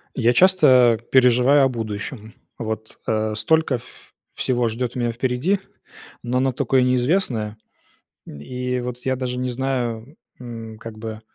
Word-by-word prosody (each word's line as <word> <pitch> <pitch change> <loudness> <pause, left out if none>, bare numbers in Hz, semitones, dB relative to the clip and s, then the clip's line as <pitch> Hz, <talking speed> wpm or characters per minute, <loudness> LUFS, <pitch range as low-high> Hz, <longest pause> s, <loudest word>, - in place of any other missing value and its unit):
Я 120 -1 +3
часто 130 - +5
переживаю 130 +2 +5
о - - +4
будущем. 110 -1 -6 0.2
Вот, 110 -1 -5
а, 110 0 0
столько 160 +4 +2
ф 120 +1 -16 0.2
всего 120 -2 0
ждет 120 +2 -3
меня 120 -1 0
впереди, 130 - 0 0.6
но 125 +1 -1
оно 130 0 +1
такое 130 0 +2
неизвестное, 125 - 0 0.7
и 125 - -4
вот, 125 0 -5
я 130 0 +1
даже 125 -1 -3
не 125 0 -2
знаю, 125 0 -3 0.2
м, 115 -3 -8
как-бы 110 -1 -8
125 Hz, 130 wpm, -22 LUFS, 115-130 Hz, 0.7 s, часто